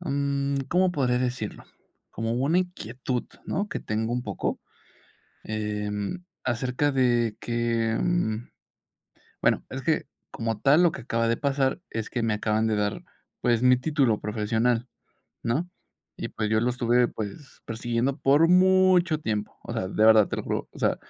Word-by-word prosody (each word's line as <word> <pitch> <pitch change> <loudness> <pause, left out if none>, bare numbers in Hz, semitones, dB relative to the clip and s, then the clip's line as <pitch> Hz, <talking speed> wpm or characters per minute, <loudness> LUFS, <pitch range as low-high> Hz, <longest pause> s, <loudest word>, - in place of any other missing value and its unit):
mm, 140 -3 -1
¿cómo 180 +3 +3
podría 125 -6 +1
decirlo? 125 -4 -3 0.5
Como 115 0 -3
una 140 +8 +2
inquietud, 130 - -3 0.2
¿no?, 205 +2 -2
que 205 - -4
tengo 110 +2 -2
un 125 0 -1
poco, 100 -5 -3 0.8
em, 105 - -3 0.2
acerca 125 +4 0
de 120 -4 +2
que, 115 -1 0
mm 120 -11 0 0.9
bueno, - - +2
es - - -4
que, - - 0 0.3
como 115 -2 -3
tal, 145 +5 +5
lo 175 - +5
que - - -7
acaba 115 -1 0
de 115 - +2
pasar 140 +1 0
es 110 -1 -4
que 120 - -2
me 115 -1 +1
acaban 110 +1 0
de 110 - +1
dar, 105 -1 -1 0.4
pues, 120 -1 +2
mi 125 0 +6
título 135 -6 +1
profesional, 110 +3 0 0.6
¿no? 145 +10 -1 0.5
Y, - - -4
pues, 110 -1 -3
yo 110 0 +2
lo 120 +2 +1
estuve, 120 0 +2
pues, 110 +6 -8
persiguiendo 120 +3 -1
por 145 +2 +4
mucho 185 -2 +5
tiempo. 105 -6 -3
O - - -5
sea, 95 - -2
de 105 +3 +2
verdad, 110 -2 +7
te - - -3
lo - - -3
juro, - - -3
o - - -13
sea, - - +2
120 Hz, 160 wpm, -26 LUFS, 110-140 Hz, 0.9 s, verdad